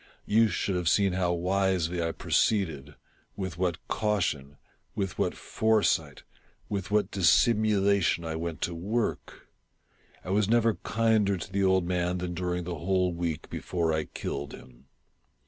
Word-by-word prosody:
You 115 Hz, +2 st, +4 dB
should 100 Hz, -2 st, -1 dB
have 90 Hz, -2 st, +1 dB
seen 100 Hz, -1 st, +3 dB
how 90 Hz, -1 st, +1 dB
wisely 90 Hz, -1 st, 0 dB
I 85 Hz, 0 st, 0 dB
proceeded 80 Hz, -9 st, 0 dB, 0.2 s
— -, -, -38 dB
with 95 Hz, -4 st, -5 dB
what 90 Hz, -2 st, -2 dB
caution 75 Hz, -10 st, -1 dB, 0.2 s
— -, -, -43 dB
with 95 Hz, -2 st, -3 dB
what -, -, 0 dB
foresight 110 Hz, -1 st, 0 dB, 0.2 s
— -, -, -36 dB
with 100 Hz, -2 st, -3 dB
what 105 Hz, -2 st, +1 dB
dissimulation 100 Hz, -2 st, +3 dB
I 80 Hz, 0 st, -3 dB
went 80 Hz, 0 st, -4 dB
to 85 Hz, -, -1 dB
work! 105 Hz, +8 st, -3 dB, 0.8 s
I 90 Hz, -, -4 dB
was 105 Hz, +1 st, +2 dB
never 115 Hz, -1 st, +3 dB
kinder 110 Hz, -3 st, +1 dB
to 90 Hz, -, -8 dB
the 100 Hz, 0 st, 0 dB
old 95 Hz, -1 st, +3 dB
man 90 Hz, 0 st, 0 dB
than 90 Hz, 0 st, -4 dB
during 90 Hz, 0 st, -2 dB
the 85 Hz, -2 st, -5 dB
whole 90 Hz, +1 st, +1 dB
week 85 Hz, -2 st, -3 dB
before 85 Hz, -3 st, -1 dB
I 80 Hz, 0 st, -1 dB
killed 70 Hz, 0 st, -5 dB
him. 65 Hz, +1 st, -17 dB
90 Hz, 160 wpm, -28 LUFS, 85-100 Hz, 0.8 s, You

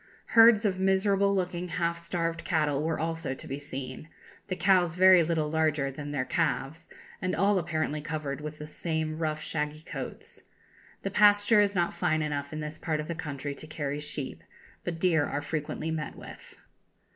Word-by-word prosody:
Herds 225 Hz, -1 st, +7 dB
of 190 Hz, -2 st, +1 dB
miserable 195 Hz, +1 st, +3 dB
looking, 180 Hz, -1 st, -2 dB
half 170 Hz, 0 st, -1 dB
starved 170 Hz, -1 st, -2 dB
cattle 150 Hz, -4 st, +1 dB
were 160 Hz, +1 st, -1 dB
also 165 Hz, -3 st, -2 dB
to -, -, -10 dB
be 135 Hz, +2 st, -4 dB
seen; 140 Hz, +1 st, -6 dB, 0.4 s
the 185 Hz, -, -2 dB
cows 180 Hz, -3 st, +3 dB
very 185 Hz, -1 st, +7 dB
little 155 Hz, -2 st, 0 dB
larger 155 Hz, -3 st, +1 dB
than 145 Hz, +2 st, -7 dB
their 140 Hz, -3 st, -1 dB
calves, 160 Hz, -2 st, -1 dB, 0.3 s
and 185 Hz, -1 st, 0 dB
all 195 Hz, +2 st, +3 dB
apparently 155 Hz, -3 st, -2 dB
covered 150 Hz, -3 st, -4 dB
with 150 Hz, 0 st, -6 dB
the 150 Hz, -, -7 dB
same 160 Hz, 0 st, -3 dB
rough 155 Hz, -1 st, -2 dB
shaggy 150 Hz, 0 st, -3 dB
coats. -, -, -7 dB, 0.6 s
The 195 Hz, -, -2 dB
pasture 205 Hz, +1 st, +6 dB
is 200 Hz, -1 st, +1 dB
not 175 Hz, -1 st, +1 dB
fine 155 Hz, -3 st, +1 dB
enough 145 Hz, -2 st, -3 dB
in 155 Hz, 0 st, -4 dB
this 150 Hz, +1 st, -6 dB
part 155 Hz, -2 st, -1 dB
of 150 Hz, -, -4 dB
the 170 Hz, -, -2 dB
country 145 Hz, -3 st, -5 dB
to 155 Hz, -, -11 dB
carry 145 Hz, -2 st, -3 dB
sheep, 140 Hz, -, -6 dB, 0.4 s
but 165 Hz, -2 st, -4 dB
deer 165 Hz, -4 st, +3 dB
are 145 Hz, -, -2 dB
frequently 155 Hz, +1 st, -3 dB
met 155 Hz, -2 st, -4 dB
with.... -, -, -12 dB
160 Hz, 180 wpm, -28 LUFS, 150-180 Hz, 0.6 s, Herds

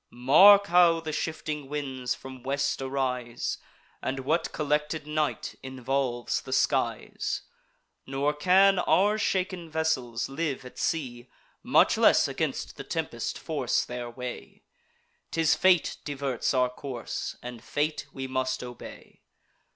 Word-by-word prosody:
Mark 190 Hz, +12 st, +7 dB
how 175 Hz, -3 st, +5 dB
the 160 Hz, -1 st, -5 dB
shifting 150 Hz, -2 st, -4 dB
winds 135 Hz, -4 st, -3 dB
from 130 Hz, -1 st, -10 dB
west 140 Hz, +1 st, -1 dB
arise, 130 Hz, -3 st, -2 dB, 0.4 s
And 135 Hz, +1 st, -3 dB
what 160 Hz, +5 st, 0 dB
collected 150 Hz, 0 st, -1 dB
night 150 Hz, 0 st, -2 dB
involves 130 Hz, -2 st, -2 dB
the -, -, -6 dB
skies! -, -, 0 dB, 0.6 s
Nor 140 Hz, +2 st, 0 dB
can 185 Hz, +5 st, +4 dB
our 205 Hz, +4 st, +3 dB
shaken 185 Hz, -4 st, -1 dB
vessels 150 Hz, -8 st, -1 dB
live 135 Hz, -2 st, -3 dB
at 125 Hz, -, -11 dB
sea, 125 Hz, -6 st, -2 dB, 0.3 s
Much -, -, +4 dB
less -, -, +5 dB
against -, -, -3 dB
the -, -, -6 dB
tempest -, -, -3 dB
force -, -, -1 dB
their 120 Hz, -1 st, -5 dB
way. 125 Hz, +1 st, -8 dB, 0.7 s
'Tis 165 Hz, -2 st, +2 dB
fate 185 Hz, -3 st, +3 dB
diverts 140 Hz, -4 st, -2 dB
our 125 Hz, -2 st, +2 dB
course, 125 Hz, -2 st, -5 dB
and 120 Hz, -1 st, -8 dB
fate 150 Hz, +1 st, -2 dB
we 135 Hz, -1 st, -5 dB
must 130 Hz, -1 st, -2 dB
obey. 125 Hz, -1 st, -11 dB
140 Hz, 125 wpm, -27 LUFS, 130-160 Hz, 0.7 s, Mark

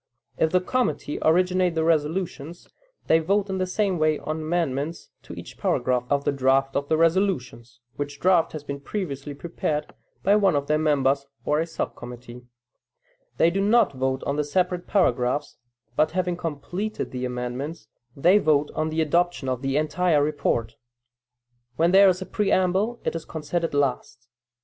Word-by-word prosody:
If 160 Hz, -, +2 dB
the 185 Hz, -, +3 dB
committee 245 Hz, -, -1 dB
originate 180 Hz, +1 st, +2 dB
the 160 Hz, -, +1 dB
resolutions, 165 Hz, 0 st, -1 dB, 0.4 s
they 160 Hz, -, +4 dB
vote, 195 Hz, +4 st, 0 dB
in 190 Hz, -, -2 dB
the 185 Hz, -, 0 dB
same 190 Hz, -1 st, 0 dB
way, 155 Hz, -1 st, +2 dB
on 155 Hz, +2 st, -4 dB
amendments 155 Hz, -1 st, -2 dB
to -, -, -11 dB
each -, -, -10 dB
paragraph 125 Hz, -1 st, 0 dB
of 140 Hz, 0 st, +1 dB
the -, -, +1 dB
draft 135 Hz, 0 st, +1 dB
of 140 Hz, 0 st, -1 dB
the 160 Hz, -, +3 dB
resolutions, 160 Hz, -, 0 dB, 0.2 s
(which 145 Hz, 0 st, -5 dB
draft 180 Hz, -3 st, +3 dB
has 155 Hz, -2 st, -6 dB
been 140 Hz, -1 st, -5 dB
previously 145 Hz, -4 st, -5 dB
prepared 150 Hz, -1 st, -3 dB, 0.3 s
by 200 Hz, +2 st, +4 dB
one 195 Hz, -6 st, +3 dB
of 140 Hz, -1 st, 0 dB
their 150 Hz, +1 st, +1 dB
members 140 Hz, -2 st, +1 dB, 0.2 s
or 150 Hz, +1 st, +2 dB
a 165 Hz, -, -1 dB
sub 165 Hz, -, -4 dB
committee); 120 Hz, 0 st, -10 dB, 1.0 s
they 165 Hz, -, +4 dB
do 195 Hz, +3 st, 0 dB
not 210 Hz, -4 st, +3 dB
vote 130 Hz, 0 st, -1 dB
on 140 Hz, -, -2 dB
the 150 Hz, -, +1 dB
separate 180 Hz, +3 st, -1 dB
paragraphs, 145 Hz, -, +1 dB, 0.4 s
but 155 Hz, -, +2 dB
having 180 Hz, -1 st, 0 dB
completed 175 Hz, +6 st, -4 dB
the 125 Hz, 0 st, -4 dB
amendments, 125 Hz, +3 st, -4 dB, 0.3 s
they 180 Hz, +8 st, +5 dB
vote 150 Hz, -4 st, +2 dB
on 155 Hz, 0 st, -1 dB
the 160 Hz, +1 st, 0 dB
adoption 170 Hz, -2 st, +1 dB
of 130 Hz, -1 st, -2 dB
the 135 Hz, 0 st, 0 dB
entire 155 Hz, 0 st, +2 dB
report. 140 Hz, -6 st, -1 dB, 1.0 s
When 165 Hz, +4 st, +3 dB
there 195 Hz, +1 st, +7 dB
is 185 Hz, 0 st, 0 dB
a -, -, -11 dB
preamble, 200 Hz, +3 st, +1 dB
it -, -, -1 dB
is 165 Hz, -, -4 dB
considered 165 Hz, 0 st, -3 dB
last. 130 Hz, -3 st, -1 dB
155 Hz, 170 wpm, -24 LUFS, 140-180 Hz, 1.0 s, there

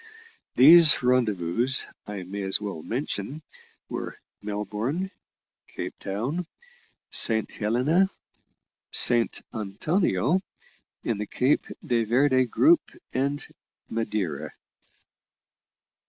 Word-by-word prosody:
These 155 Hz, +2 st, +8 dB
rendezvous, 115 Hz, -4 st, +1 dB, 0.4 s
I 100 Hz, -2 st, -6 dB
may 100 Hz, +3 st, -6 dB
as 95 Hz, 0 st, 0 dB
well 100 Hz, -6 st, -5 dB
mention, 130 Hz, -, -4 dB, 0.4 s
were -, -, -6 dB, 0.2 s
Melbourne, 105 Hz, -, -3 dB, 0.6 s
Cape -, -, -6 dB
Town, 130 Hz, -, -3 dB, 0.6 s
Saint 110 Hz, -1 st, +3 dB
Helena, 130 Hz, -, +1 dB, 0.8 s
Saint 120 Hz, -1 st, +4 dB
Antonio 120 Hz, -, 0 dB, 0.6 s
in 115 Hz, -3 st, -2 dB
the 105 Hz, -, -4 dB
Cape 130 Hz, +3 st, +1 dB, 0.2 s
de 120 Hz, -2 st, +1 dB
Verde 130 Hz, +3 st, +3 dB
group, 320 Hz, -, +4 dB, 0.3 s
and 140 Hz, +2 st, -1 dB, 0.5 s
Madeira. 105 Hz, -9 st, -3 dB
120 Hz, 85 wpm, -26 LUFS, 105-145 Hz, 0.8 s, These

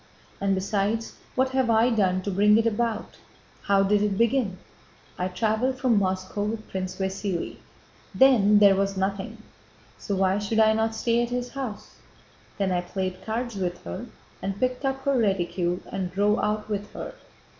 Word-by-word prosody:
"And 195 Hz, -1 st, +2 dB
besides, 205 Hz, +3 st, -1 dB, 0.2 s
what 260 Hz, 0 st, +2 dB
have 260 Hz, -2 st, +1 dB
I 230 Hz, +2 st, +4 dB
done 185 Hz, -4 st, +1 dB
to 200 Hz, -, -2 dB
bring 210 Hz, +3 st, +5 dB
it 225 Hz, -, +2 dB
about? 230 Hz, 0 st, -1 dB, 0.5 s
How 200 Hz, -1 st, +4 dB
did 205 Hz, +1 st, +3 dB
it 205 Hz, -2 st, 0 dB
begin? 230 Hz, -4 st, +1 dB, 0.6 s
I 180 Hz, -, 0 dB
traveled 220 Hz, +7 st, 0 dB
from 245 Hz, -5 st, +3 dB
Moscow 185 Hz, +1 st, -2 dB
with 215 Hz, +1 st, -3 dB
Prince 185 Hz, -1 st, -3 dB
Vasíli. 190 Hz, -2 st, -3 dB, 0.6 s
Then 220 Hz, -6 st, +6 dB
there 200 Hz, -1 st, +7 dB
was 195 Hz, 0 st, 0 dB
nothing. 195 Hz, 0 st, -2 dB, 0.6 s
So 200 Hz, -, -2 dB
why 190 Hz, +1 st, +2 dB
should 210 Hz, +2 st, -2 dB
I 220 Hz, 0 st, +6 dB
not 220 Hz, 0 st, 0 dB
stay 235 Hz, +1 st, +1 dB
at 240 Hz, -, -1 dB
his 245 Hz, 0 st, -3 dB
house? 255 Hz, -7 st, -7 dB, 0.6 s
Then 195 Hz, -2 st, 0 dB
I 180 Hz, -1 st, +1 dB
played 185 Hz, +1 st, -4 dB
cards 230 Hz, 0 st, -3 dB
with 180 Hz, -2 st, -3 dB
her 85 Hz, +1 st, -6 dB, 0.3 s
and 195 Hz, 0 st, -3 dB
picked 255 Hz, +1 st, -1 dB
up 270 Hz, 0 st, -1 dB
her 280 Hz, 0 st, +2 dB
reticule 180 Hz, -5 st, 0 dB
and 185 Hz, -2 st, -3 dB
drove 205 Hz, +3 st, +2 dB
out 210 Hz, 0 st, -1 dB
with 205 Hz, -1 st, -4 dB
her. -, -, -6 dB
205 Hz, 170 wpm, -26 LUFS, 190-230 Hz, 0.6 s, there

